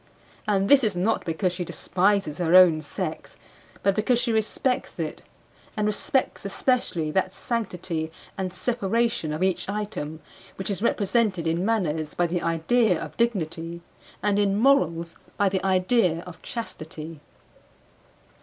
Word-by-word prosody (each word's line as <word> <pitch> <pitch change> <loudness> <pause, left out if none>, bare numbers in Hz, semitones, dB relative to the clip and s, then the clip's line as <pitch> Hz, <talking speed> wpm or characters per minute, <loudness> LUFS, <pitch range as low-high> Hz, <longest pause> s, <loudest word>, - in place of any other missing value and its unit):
And 195 -2 +2
this 275 +2 +6
is 210 -4 +1
not 195 +6 0
because 175 +2 0
she 180 - -3
despises 185 -1 0
her 175 0 +3
own 175 -4 +7
sex, 150 - -5 0.5
but 195 - +4
because 220 +3 +2
she 240 -1 0
respects 225 +4 -1
it; - - -4 0.6
and 210 - +1
respects 210 +5 0
especially 200 - 0
that 190 +2 0
sanctity 180 -8 -3 0.3
and 190 -1 -3
separation 230 -4 0
of 155 +4 -2
each 190 0 0
item 200 -7 -4 0.4
which 190 +1 -3
is 200 - -3
represented 210 -5 +1
in 165 +2 0
manners 160 -9 0
by 175 - +2
the 175 +1 -1
idea 170 +4 +2
of - - -7
dignity 170 -7 -2 0.4
and 205 -1 +2
in 200 -1 +2
morals 170 - +2 0.2
by 200 -1 +3
the 190 0 -1
idea 185 -2 +2
of 180 -2 -11
chastity. 160 -8 -7
190 Hz, 140 wpm, -25 LUFS, 165-215 Hz, 0.6 s, own